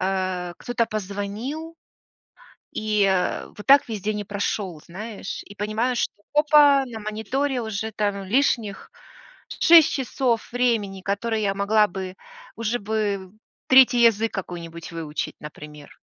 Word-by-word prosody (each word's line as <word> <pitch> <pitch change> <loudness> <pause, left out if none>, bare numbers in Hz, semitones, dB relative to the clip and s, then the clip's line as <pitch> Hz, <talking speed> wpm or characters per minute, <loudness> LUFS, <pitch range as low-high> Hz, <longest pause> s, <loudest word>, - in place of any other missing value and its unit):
э, 185 -2 -2
кто-то 240 -1 -1
позвонил. 215 - -5 1.0
И, 210 -1 +1
э, 190 -2 0
вот 210 - -9
так 275 0 +6
весь 215 -4 -5
день 210 +1 -2
и 205 - -5
прошел, 200 -4 -3
знаешь? 205 +3 -7
И 205 - -12
понимаю, 215 +5 -1
что - - 0 0.2
опа! 295 -2 +6
На 235 -3 -7
мониторе 245 +6 -2
уже 220 0 -4
там 205 -2 -2
лишних 225 -2 0 0.6
6 330 -3 +6
часов 255 -3 -1
времени, 230 -6 0
которые 215 +2 -1
я 195 -1 0
могла 210 +2 +3
бы 185 0 -6 0.4
уже 230 +1 -1
бы 200 -3 -2 0.4
третий 255 -2 +6
язык 225 -1 +3
какой-нибудь 170 -3 -6
выучить, 160 -2 -4
например. 150 -1 -11
210 Hz, 130 wpm, -24 LUFS, 195-240 Hz, 1.0 s, так